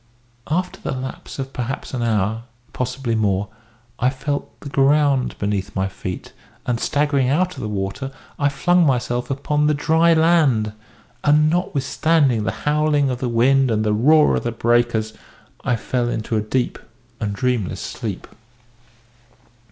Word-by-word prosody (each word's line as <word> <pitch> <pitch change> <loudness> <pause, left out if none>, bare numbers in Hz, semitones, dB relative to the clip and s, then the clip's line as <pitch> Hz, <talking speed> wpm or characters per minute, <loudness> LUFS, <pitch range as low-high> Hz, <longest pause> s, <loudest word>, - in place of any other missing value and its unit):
After 180 +4 -2
the - - -3
lapse 130 0 -7
of 135 0 -5
perhaps 125 +3 -4
an 125 - -2
hour, 110 0 0 0.3
possibly 125 -1 -2
more, 105 -2 0 0.5
I 125 - +3
felt 140 +2 -4
the 140 - -7
ground 140 -1 +2
beneath 100 0 -2
my 95 0 0
feet, 95 -1 -7 0.3
and 120 -2 -1
staggering 140 -2 +1
out 180 +6 +1
of - - -7
the 110 - -3
water, 100 +7 -3 0.3
I 145 -1 +3
flung 175 +6 +3
myself 125 -3 0
upon 150 +2 0
the 150 - +2
dry 160 +3 +3
land, 155 -10 +3 0.5
and, 150 +1 +4
notwithstanding 145 - +1
the - - 0
howling 150 -2 +2
of 125 - -3
the 125 - -1
wind 130 +3 +3
and 110 -1 +1
the 105 - +2
roar 150 +8 +5
of - - 0
the 120 - -1
breakers, 115 -1 +1 0.5
I 125 - +1
fell 120 +1 -1
into 110 -1 -2
a 105 - +2
deep 120 +4 -1 0.4
and 105 -1 -2
dreamless 125 -5 -1
sleep. - - -5
130 Hz, 150 wpm, -21 LUFS, 115-145 Hz, 0.5 s, roar